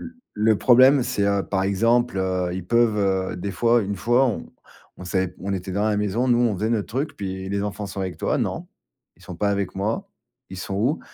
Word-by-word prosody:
L -, -, -7 dB, 0.3 s
le 110 Hz, 0 st, +3 dB
problème, 130 Hz, +2 st, +6 dB
c'est, 100 Hz, -4 st, -1 dB
heu, 100 Hz, -1 st, +1 dB
par 95 Hz, -1 st, -1 dB
exemple, 115 Hz, +4 st, +2 dB
heu, 95 Hz, -1 st, -1 dB
ils 90 Hz, -1 st, -6 dB
peuvent, 115 Hz, 0 st, +3 dB, 0.4 s
heu, -, -, -7 dB
des 95 Hz, +3 st, -4 dB
fois 120 Hz, +3 st, +3 dB
une 100 Hz, 0 st, -3 dB
fois, 120 Hz, +5 st, +3 dB
on 120 Hz, -, -4 dB, 0.5 s
on 90 Hz, -, -9 dB
savait 95 Hz, 0 st, 0 dB
p -, -, -18 dB
on 100 Hz, +1 st, -3 dB
était 95 Hz, 0 st, -5 dB
dans 105 Hz, +3 st, +1 dB
la 105 Hz, -, +1 dB
maison, 105 Hz, +5 st, 0 dB
nous, 120 Hz, -, +4 dB
on 120 Hz, -3 st, +2 dB
faisait 110 Hz, +4 st, -1 dB
notre 110 Hz, -3 st, -1 dB
truc, 135 Hz, +6 st, -3 dB
puis: 95 Hz, -1 st, -5 dB
«Les 100 Hz, 0 st, -1 dB
enfants 105 Hz, 0 st, -4 dB
sont 100 Hz, 0 st, -6 dB
avec 95 Hz, -4 st, -4 dB
toi?», -, -, 0 dB
«Non, -, -, -3 dB, 0.5 s
ils -, -, -22 dB
sont 90 Hz, -, -9 dB
pas 100 Hz, +3 st, 0 dB
avec 100 Hz, -2 st, -2 dB
moi, 105 Hz, +4 st, -2 dB, 0.4 s
ils 95 Hz, -, -7 dB
sont 95 Hz, +1 st, -5 dB
où?» 125 Hz, +11 st, 0 dB
100 Hz, 235 wpm, -23 LUFS, 95-115 Hz, 0.5 s, problème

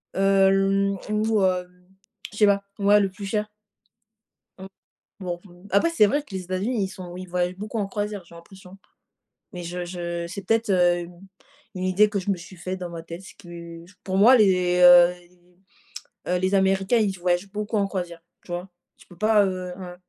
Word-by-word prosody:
Hem 195 Hz, 0 st, +3 dB
ou 215 Hz, 0 st, +1 dB
heu, 180 Hz, -1 st, +1 dB, 0.6 s
je 210 Hz, -, -12 dB
sais 210 Hz, -, +5 dB
pas, 200 Hz, -1 st, +2 dB, 0.2 s
ouais, 205 Hz, +1 st, +5 dB
le 200 Hz, -1 st, +1 dB
plus 195 Hz, +2 st, -9 dB
cher. 210 Hz, +1 st, -2 dB, 1.1 s
Mmh. 190 Hz, -, -8 dB, 0.6 s
Bon, 175 Hz, -2 st, -4 dB
mmh, 175 Hz, 0 st, -16 dB
après, 200 Hz, -, +3 dB
c'est 330 Hz, -11 st, +4 dB
vrai 290 Hz, +8 st, 0 dB
que 250 Hz, -9 st, -13 dB
les 190 Hz, -, -3 dB
États-Unis, 195 Hz, +5 st, -1 dB
ils -, -, -3 dB
sont 180 Hz, -2 st, -9 dB
ils 185 Hz, 0 st, -8 dB
voyagent 180 Hz, 0 st, -1 dB
beaucoup 215 Hz, +3 st, -5 dB
en 205 Hz, -, -1 dB
croisière, 205 Hz, -1 st, -4 dB
j'ai 170 Hz, -, -17 dB
l'impression. 185 Hz, +2 st, -14 dB, 0.8 s
Mais 180 Hz, -1 st, -6 dB
je 175 Hz, +1 st, -5 dB
je 170 Hz, -1 st, -4 dB
c'est 200 Hz, +3 st, -7 dB
peut-être, 225 Hz, +2 st, +1 dB
heu, 175 Hz, -2 st, +2 dB
mmh, -, -, -13 dB, 0.6 s
u -, -, -5 dB
une -, -, -3 dB
idée 195 Hz, +3 st, +3 dB
que 205 Hz, -1 st, -2 dB
je 185 Hz, -, -5 dB
me -, -, +1 dB
suis 175 Hz, +2 st, -12 dB
faite 185 Hz, +2 st, -5 dB
dans 180 Hz, -1 st, -5 dB
ma 170 Hz, -1 st, -7 dB
tête, 170 Hz, +2 st, -9 dB
ce 190 Hz, -, -13 dB
qui 170 Hz, -2 st, -11 dB, 0.2 s
pour 190 Hz, 0 st, -2 dB
moi, 230 Hz, +6 st, +7 dB
les, 180 Hz, -5 st, +3 dB
heu, 175 Hz, 0 st, +8 dB
les, 175 Hz, 0 st, -21 dB, 0.9 s
heu, 180 Hz, -, +2 dB
les 185 Hz, +2 st, 0 dB
Américains, 195 Hz, +3 st, +2 dB
ils 200 Hz, -4 st, 0 dB
voyagent 180 Hz, +2 st, -1 dB
beaucoup 210 Hz, +2 st, -3 dB
en 200 Hz, -1 st, +2 dB
croisière, 175 Hz, -4 st, -5 dB, 0.2 s
tu -, -, -9 dB
vois? 175 Hz, +2 st, -4 dB, 0.3 s
Tu -, -, -20 dB
peux 180 Hz, -, -15 dB
pas, 215 Hz, 0 st, +4 dB
heu, 185 Hz, -1 st, -3 dB
ouais, 180 Hz, -2 st, -8 dB
190 Hz, 205 wpm, -24 LUFS, 180-200 Hz, 1.1 s, heu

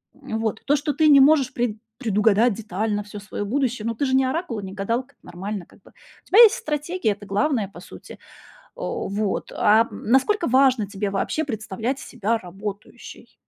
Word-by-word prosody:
М, 220 Hz, -, -5 dB
вот. 220 Hz, -1 st, -2 dB
То, 290 Hz, -, +3 dB
что 295 Hz, 0 st, -1 dB
ты 310 Hz, +2 st, +3 dB
не 285 Hz, -2 st, +8 dB
можешь 280 Hz, -2 st, +4 dB
пред 235 Hz, -3 st, -1 dB, 0.2 s
предугадать 220 Hz, -1 st, +2 dB
детально 210 Hz, 0 st, -3 dB
всё 205 Hz, 0 st, -10 dB
своё 205 Hz, 0 st, -5 dB
будущее, 250 Hz, -1 st, -1 dB
ну 230 Hz, -, -2 dB
ты 280 Hz, -, -1 dB
же 260 Hz, -, -1 dB
не 265 Hz, -, +3 dB
оракул 285 Hz, -, -2 dB
и -, -, -7 dB
не 190 Hz, -, -8 dB
гадалка, 235 Hz, +7 st, -3 dB
нормально 190 Hz, +2 st, -6 dB
как -, -, -22 dB
бы, -, -, -20 dB, 0.3 s
у -, -, -51 dB
тебя 415 Hz, -, +4 dB
есть 460 Hz, 0 st, +9 dB
стратегия, 305 Hz, -, -2 dB
это 205 Hz, 0 st, -7 dB
главное 210 Hz, +2 st, 0 dB
по 175 Hz, -, -12 dB
сути. -, -, -12 dB, 0.6 s
О, -, -, -4 dB
вот. 205 Hz, 0 st, -2 dB
А 220 Hz, +2 st, +4 dB
насколько 270 Hz, -, +1 dB
важно 260 Hz, -4 st, +3 dB
тебе 200 Hz, 0 st, -3 dB
вообще 200 Hz, +10 st, -1 dB
представлять 225 Hz, +1 st, -4 dB
себя 230 Hz, -1 st, -2 dB
работающей? 200 Hz, +2 st, -9 dB
225 Hz, 185 wpm, -23 LUFS, 205-275 Hz, 0.6 s, есть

